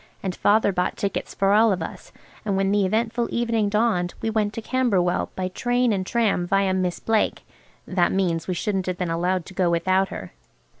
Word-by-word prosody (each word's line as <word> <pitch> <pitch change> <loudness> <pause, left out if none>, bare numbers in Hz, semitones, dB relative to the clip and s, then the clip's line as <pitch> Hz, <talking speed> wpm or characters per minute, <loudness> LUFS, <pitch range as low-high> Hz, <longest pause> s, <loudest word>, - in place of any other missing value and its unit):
And 190 -2 -2
Father 205 +2 +3
bought 180 0 -1
tickets 200 - -3
for 195 0 +2
all 220 +1 +5
of 180 -4 -1
us, - - -9 0.3
and 200 -3 -1
when 195 0 +1
the 200 -2 +2
eventful 230 +3 0
evening 230 -3 0
dawned 210 -5 +1
we 225 - -2
went 215 -2 0
to - - -4
Camberwell 205 -9 +1
by 185 -1 -2
train 245 +4 +1
and 190 -2 -2
tram 210 -7 +1
viâ 195 0 +2
Miss 180 -2 -1
Blake 220 -1 0 0.4
(that 180 -2 +1
means 175 -4 0
we 185 - -1
shouldn't 190 +1 -2
have 180 -1 -2
been 180 -2 -2
allowed 175 +1 0
to - - -11
go 185 -2 +1
without 185 +3 +2
her). 95 - -7
195 Hz, 200 wpm, -23 LUFS, 180-220 Hz, 0.4 s, all